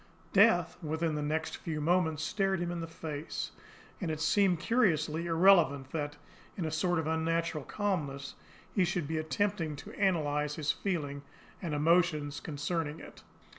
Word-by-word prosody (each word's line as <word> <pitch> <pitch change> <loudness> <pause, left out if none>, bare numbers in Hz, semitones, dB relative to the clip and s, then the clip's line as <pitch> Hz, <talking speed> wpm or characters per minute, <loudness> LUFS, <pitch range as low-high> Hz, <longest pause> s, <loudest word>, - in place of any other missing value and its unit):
Death, 180 -5 +5
within 160 0 -1
the 150 - -2
next 155 +2 -2
few 160 -2 -4
moments, 160 -1 +1
stared 195 +1 0
him 175 0 -2
in 175 - -3
the 165 - -4
face; 160 -2 -5 0.5
and 175 - -1
it 155 -1 -2
seemed 180 +2 +3
curiously 165 -9 +1
irrelevant 165 -6 +4
that, 145 -2 -3 0.4
in 175 - -2
a 155 - -2
sort 175 +3 +1
of 160 - -1
unnatural 160 -1 0
calmness, 145 -8 -2 0.4
he 190 - +3
should 175 -3 -1
be 160 +1 -1
attempting 165 -1 -1
to - - -10
analyse 150 -6 +1
his 150 -2 +1
feelings 145 -7 -3 0.4
and 165 -4 -2
emotions 155 -2 +2
concerning 150 +1 -3
it. - - -12
160 Hz, 155 wpm, -31 LUFS, 150-175 Hz, 0.5 s, Death